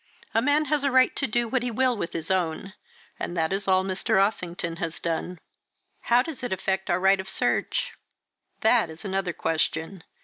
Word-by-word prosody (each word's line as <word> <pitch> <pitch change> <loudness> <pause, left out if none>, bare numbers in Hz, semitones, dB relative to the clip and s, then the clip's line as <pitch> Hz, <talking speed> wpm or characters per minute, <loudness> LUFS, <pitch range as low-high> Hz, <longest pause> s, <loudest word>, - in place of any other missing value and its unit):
A 225 - +3
man 290 +4 +3
has 295 0 0
a 280 - +3
right 260 -1 +4
to 275 - -1
do 240 +2 0
what 255 +2 0
he 245 - -2
will 255 +2 +1
with 175 -5 -4
his 165 +2 -3
own 185 +1 -1 0.5
and 175 - -4
that 160 +2 +1
is 195 +1 -2
all 185 0 +4
Mr. 190 0 0
Ossington 175 -4 -1
has 165 -3 -4
done." 170 +2 -3 0.7
"How 240 +1 +5
does 315 -1 -7
it 245 - -4
effect 190 0 -1
our 175 - +2
right 195 +1 +4
of 190 0 -6
search?" - - 0 0.7
"That 220 -4 +4
is 160 +5 -10
another 190 -2 -1
question. 165 +2 -2
190 Hz, 195 wpm, -26 LUFS, 175-240 Hz, 0.7 s, How